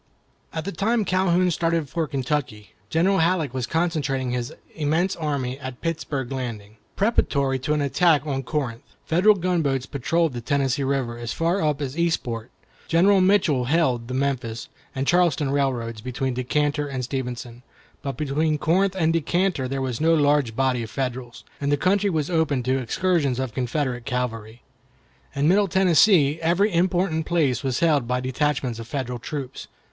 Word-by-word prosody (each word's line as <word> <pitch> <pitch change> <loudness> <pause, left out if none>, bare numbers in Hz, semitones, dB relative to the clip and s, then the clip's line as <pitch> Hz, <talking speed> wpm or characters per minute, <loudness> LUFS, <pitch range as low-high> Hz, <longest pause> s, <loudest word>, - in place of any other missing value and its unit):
At 160 -1 -4
the 200 - -3
time 220 +2 0
Calhoun 185 -1 +2
started 165 -2 0
for 165 +2 -2
Kentucky, 135 -7 -3 0.2
General 190 +4 +2
Halleck 165 -5 +1
was 130 -2 -2
concentrating 145 -5 -1
his 125 -1 -3 0.2
immense 160 +4 0
army 140 -5 -3
at 130 -2 -7
Pittsburg 150 -6 -3
Landing, 110 -5 -5 0.2
preparatory 140 - +1
to 145 +4 -1
an 150 - 0
attack 155 +1 +3
on 135 -3 -2
Corinth. 130 -4 -3 0.2
Federal 185 +6 +4
gunboats 165 -8 0
patrolled 160 +3 0
the 120 - -5
Tennessee 140 +2 0
River 130 -3 -1
as 120 -1 -4
far 170 +4 0
up 150 -1 0
as 135 0 -4
Eastport. 130 -9 -1 0.4
General 190 +4 +4
Mitchell 180 -9 +3
held 130 -5 +1
the 130 - -4
Memphis 130 -4 -2 0.3
and 135 +1 -1
Charleston 165 -5 +2
Railroad 120 -6 -1
between 130 +1 -2
Decatur 145 +4 0
and 130 -2 -4
Stevenson, 125 -2 -5 0.4
but 140 -1 -4
between 150 +1 0
Corinth 190 +6 +1
and 165 -3 +2
Decatur 165 -2 0
there 135 +1 -2
was 130 0 -3
no 165 +1 +4
large 145 -6 +2
body 130 -1 +1
of 115 - -6
Federals, 125 -1 -4 0.2
and 140 0 0
the 145 - +3
country 200 +6 +2
was 155 -5 -1
open 155 -6 +1
to 130 +2 +1
excursions 140 +1 0
of 130 -3 -3
Confederate 125 -1 -2
cavalry. 120 -3 -4 0.7
In 140 +1 +1
Middle 200 +4 +4
Tennessee 175 -4 +4
every 180 +5 +2
important 175 -2 +1
place 145 -8 +1
was 130 0 -2
held 150 -7 +3
by 125 +1 0
detachments 130 -2 -1
of 115 - -8
Federal 125 -1 -4
troops. 135 +1 -6
140 Hz, 160 wpm, -24 LUFS, 125-165 Hz, 0.7 s, Federal